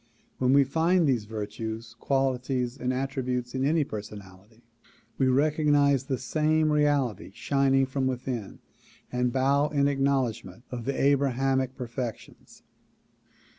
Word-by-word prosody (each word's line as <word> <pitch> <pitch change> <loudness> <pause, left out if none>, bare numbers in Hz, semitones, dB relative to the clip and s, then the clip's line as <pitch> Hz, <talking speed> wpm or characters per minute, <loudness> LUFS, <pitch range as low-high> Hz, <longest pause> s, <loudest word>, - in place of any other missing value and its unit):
When 130 0 +2
we 140 0 +6
find 165 +5 +2
these 125 -7 +1
virtues, 110 +1 -6
qualities 130 -2 -1
and 125 -1 -2
attrib 135 0 -3
utes 125 -1 -2
in 130 0 -1
any 155 +3 +2
personality, 105 0 -10 0.6
we 135 - +3
recognize 145 0 +3
the 135 -1 -2
same 155 +4 +1
reality 145 -8 +1
shining 135 +2 +2
from 130 0 -1
within 125 -4 -4 0.5
and 125 0 0
bow 140 +3 +2
in 140 -2 +2
acknowledgment 135 -7 -1
of 120 -2 -5
the 140 - -2
Abrahamic 135 -1 +1
perfections. 120 -2 -7
130 Hz, 125 wpm, -27 LUFS, 120-140 Hz, 0.6 s, we